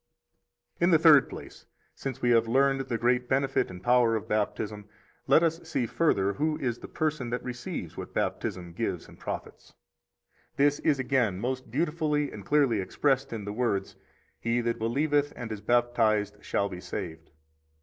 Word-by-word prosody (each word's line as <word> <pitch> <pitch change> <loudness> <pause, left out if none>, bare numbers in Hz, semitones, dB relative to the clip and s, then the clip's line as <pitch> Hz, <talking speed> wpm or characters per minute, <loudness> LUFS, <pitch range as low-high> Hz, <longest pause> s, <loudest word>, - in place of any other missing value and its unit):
32 - - -1
In 175 - +5
the 165 - +6
third 155 -4 +6
place, - - -10 0.3
since 135 -3 -6
we 120 - +4
have 115 -1 +4
learned 135 +3 +3
the 120 -3 -2
great 125 +2 +1
benefit 135 0 +1
and 90 0 -10
power 120 -2 +4
of 110 - -4
Baptism, 105 0 -2 0.4
let 165 - +5
us 165 0 +1
see 140 -7 -2
further 100 -8 +1
who 150 +4 0
is 120 -3 -2
the - - -9
person 155 -6 -2
that 125 +1 -3
receives 125 - -5
what - - -6
Baptism 90 -2 -2
gives - - -3
and - - -16
profits. - - -7 0.8
33 140 - +5
This 145 0 +2
is 150 -3 +2
again 125 -7 +1
most 130 +2 -3
beautifully 150 +1 0
and 105 - -9
clearly 140 -6 +2
expressed 135 +7 0
in 110 -3 -5
the 105 - -4
words: 105 -5 -1 0.4
He 115 +1 0
that 115 0 -1
believeth 145 +5 +1
and 115 -2 -6
is 105 -2 -5
baptized 110 -4 +1
shall 100 - 0
be 90 -2 -8
saved. 80 -2 -6
125 Hz, 175 wpm, -28 LUFS, 110-140 Hz, 0.8 s, the